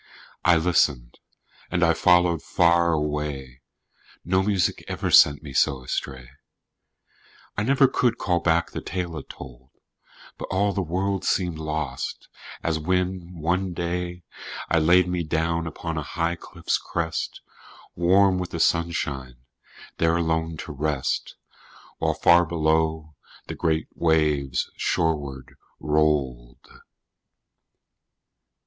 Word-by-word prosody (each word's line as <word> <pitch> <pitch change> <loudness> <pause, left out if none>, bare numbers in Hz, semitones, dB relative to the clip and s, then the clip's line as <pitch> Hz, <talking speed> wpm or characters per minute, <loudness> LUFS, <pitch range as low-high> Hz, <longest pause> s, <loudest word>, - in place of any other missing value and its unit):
I 90 -1 +5
listened, 75 -7 +1 0.5
and 90 - 0
I 85 0 +5
followed 90 -1 +3
far 85 0 +3
away 75 -4 -3 0.6
No 95 +2 +2
music 95 -2 0
ever - - -3
sent 70 0 +6
me 70 -3 -8
so 65 0 +1
astray, 65 0 -4 1.3
I - - -1
never 135 +4 +4
could 120 -2 +1
call 90 -3 0
back 85 0 +1
the - - -5
tale 90 -3 -4
it - - -14
told, 65 -1 -11 0.7
But - - -4
all 100 +2 +1
the 100 - -1
world 95 +3 -2
seemed 90 -4 0
lost, 75 -4 -4 0.3
as 80 -1 0
when, 90 +1 -2
one 90 +3 0
day, 90 +1 -3 0.5
I 85 - +4
laid 90 +3 +4
me 90 -1 -1
down 80 +1 -1
upon 80 0 -4
a - - -3
high 85 +3 -2
cliff's 85 0 -3
crest, 80 -1 -3 0.6
Warm 95 +2 +4
with 90 -1 -4
the 85 - -5
sunshine, 70 -7 0 0.6
there 85 0 +3
alone 80 -1 -1
to - - -7
rest, 75 -1 -2 0.6
While - - 0
far 85 0 +5
below 80 -1 0 0.3
the - - -6
great 80 -1 -1
waves 75 -5 +1
shoreward 70 -6 -2 0.3
rolled. 70 -6 -1
80 Hz, 120 wpm, -24 LUFS, 75-90 Hz, 1.3 s, sent